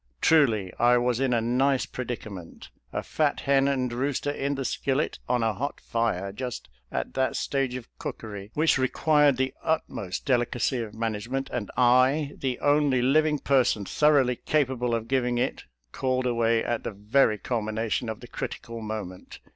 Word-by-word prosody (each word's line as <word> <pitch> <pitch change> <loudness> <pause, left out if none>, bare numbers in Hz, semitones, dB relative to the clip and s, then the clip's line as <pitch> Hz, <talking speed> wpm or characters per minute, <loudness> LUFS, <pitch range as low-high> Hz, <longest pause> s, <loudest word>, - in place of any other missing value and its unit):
Truly, 115 - +3
I 120 +1 +5
was 120 0 +1
in 135 -1 +1
a 120 -2 +2
nice 130 +3 +2
predicament. 110 -8 -7 0.2
A - - -3
fat 150 -2 0
hen 135 0 +3
and 130 -3 0
rooster 140 +3 -1
in 140 0 -2
the 135 -1 -3
skillet 135 +3 -1
on 125 -1 +2
a 110 -1 +1
hot 140 +6 -4
fire, 110 -5 -1
just 125 - -6 0.2
at - - -3
that 130 0 0
stage 135 -3 -1
of 125 -2 -7
cookery 105 -2 -6
which 155 -2 +3
required 145 +1 +3
the 130 0 0
ut 160 -1 +1
most 90 -2 -5
delicacy 125 0 +1
of 110 -2 -7
management, 115 +4 -3
and 115 -5 -3
I, 130 +4 +4
the 130 -2 -2
only 145 -3 +3
living 150 +3 +3
person 130 -7 +2
thoroughly 135 -1 +3
capable 130 -5 0
of 115 0 -4
giving 125 -1 +1
it, 125 +2 -2 0.3
called 130 - -1
away 115 -2 +2
at 120 -1 -2
the - - -3
very 105 +3 +2
culmination 110 0 -2
of 110 - -6
the 120 - -10
crit - - -4
ical 115 -1 -8
moment. 105 -4 -6
125 Hz, 170 wpm, -26 LUFS, 115-135 Hz, 0.3 s, I